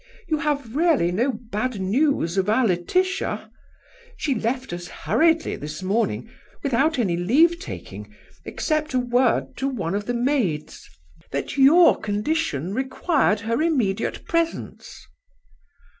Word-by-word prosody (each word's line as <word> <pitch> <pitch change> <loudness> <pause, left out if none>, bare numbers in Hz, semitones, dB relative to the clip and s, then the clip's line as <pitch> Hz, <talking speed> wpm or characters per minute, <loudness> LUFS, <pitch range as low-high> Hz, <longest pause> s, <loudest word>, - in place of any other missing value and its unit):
You 310 -2 +1
have 285 -6 -2
really 305 - +3
no 235 +9 +1
bad 230 0 -4
news 200 - +1
of 190 +1 +1
our 235 +4 +3
Laetitia? 360 - -1 0.7
She 285 - 0
left 250 0 -2
us 175 0 -6
hurriedly 320 - +1
this 150 +4 -7
morning, 185 - 0 0.4
without 280 +4 +1
any 195 -8 +1
leave 295 - +3
taking, 390 - -8 0.3
except 310 -3 -2
a - - +4
word 245 0 +1
to 270 - -1
one 200 -10 -3
of 205 +1 -3
the 245 - -1
maids, 235 - -1 0.4
that 140 - -3
your 290 +6 +6
condition 205 - -1
required 260 - +1
her 230 +4 -1
immediate 240 -11 0
presence." 335 0 -3
245 Hz, 130 wpm, -23 LUFS, 195-300 Hz, 0.7 s, your